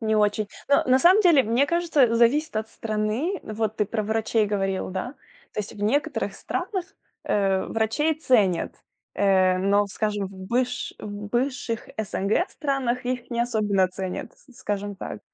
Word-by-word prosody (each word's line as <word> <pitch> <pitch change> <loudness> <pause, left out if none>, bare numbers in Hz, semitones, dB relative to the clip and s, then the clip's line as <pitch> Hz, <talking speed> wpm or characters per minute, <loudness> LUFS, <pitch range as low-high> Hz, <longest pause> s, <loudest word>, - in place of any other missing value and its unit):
Не 220 -1 +1
очень. 210 0 +2 0.2
Ну, 280 - +5
на 260 0 +5
самом 370 +8 +6
деле, 335 -8 +6
мне 235 +5 +2
кажется, 300 -8 +2
зависит 240 +4 +3
от 215 0 -2
страны. 220 - -2
Вот 215 0 -3
ты 210 - +1
про 215 +1 -2
врачей 220 0 +1
говорил, 195 -2 -1
да. 195 +9 -4 0.4
То - - -2
есть 210 - -7
в 205 - -8
некоторых 265 +8 0
странах, 380 -5 -3 0.4
э, 195 -2 +1
врачей 225 +9 +1
ценят, 225 - +2 0.4
э, 190 -2 +3
но, 200 +2 +3
скажем, 205 0 -2
в 190 - -11
быш 245 +6 -2
в 210 - -7 0.2
бывших 240 -1 -2
СНГ 215 - 0
странах 260 -4 -1
их 250 -1 -3
не 235 -1 -1
особенно 210 -5 +2
ценят, 185 +3 -5
с 255 -4 -20
скажем 205 -1 -3
так. - - -7
220 Hz, 160 wpm, -25 LUFS, 205-255 Hz, 0.4 s, самом